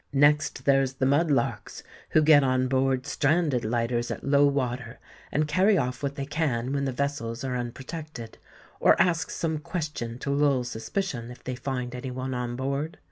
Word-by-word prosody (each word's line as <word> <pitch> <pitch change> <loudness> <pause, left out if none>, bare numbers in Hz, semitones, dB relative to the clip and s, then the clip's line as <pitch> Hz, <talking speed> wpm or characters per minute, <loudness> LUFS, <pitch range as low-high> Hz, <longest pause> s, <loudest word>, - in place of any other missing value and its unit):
Next 145 -1 +3
there's 135 -1 +3
the 130 0 -1
mud 145 +5 +3
larks, 140 - -1 0.3
who 155 - +4
get 150 -2 +7
on 130 -1 +2
board 130 0 +1
stranded 150 -3 +1
lighters 120 +1 -1
at - - -5
low 140 +1 +4
water, 125 -3 -2 0.3
and 150 +1 +1
carry 190 +6 +3
off 125 -4 -1
what 140 -1 -2
they 140 -2 -3
can 135 -4 -1
when 140 -1 0
the 135 - -1
vessels 130 -3 -3
are 130 -1 -2
unprotected, 130 +1 -6 0.4
or - - +5
ask 170 -2 +2
some 160 -2 -2
question 150 -8 -4
to 140 - -3
lull 140 -2 +2
suspicion 120 - -3
if 125 - -12
they 130 - -4
find 125 -1 -4
any 125 +1 -5
one 130 +1 -4
on 125 -1 -3
board. 140 +5 -3
135 Hz, 180 wpm, -27 LUFS, 125-150 Hz, 0.4 s, get